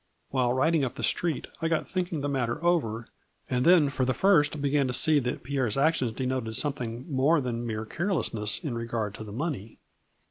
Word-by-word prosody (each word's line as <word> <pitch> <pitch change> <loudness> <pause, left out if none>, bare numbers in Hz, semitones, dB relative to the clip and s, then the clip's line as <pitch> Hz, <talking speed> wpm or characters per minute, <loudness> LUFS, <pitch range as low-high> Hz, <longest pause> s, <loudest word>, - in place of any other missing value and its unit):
" - - -45
While 125 -2 +1
riding 155 +4 +2
up 130 - -2
the 115 - -6
street 150 - 0 0.2
I 165 - +1
got 165 -1 0
thinking 180 -5 -2
the 145 - -1
matter 130 +1 -2
over 115 -10 +1 0.4
and 125 0 0
then 165 -4 +5
for 135 - -1
the 130 0 +1
first 155 -6 +3
began 140 -1 +1
to 125 - -2
see 150 +3 +4
that 125 -2 -3
Pierre's 130 -4 -1
actions 135 -4 +2
denoted 125 -3 -2
something 125 -4 -2
more 145 +2 +3
than 120 -3 -3
mere 110 -1 -3
carelessness 115 - -1
in 145 -6 -3
regard 115 -3 -3
to 110 - -8
the 105 - -9
money. 125 - -4
130 Hz, 200 wpm, -27 LUFS, 115-155 Hz, 0.4 s, then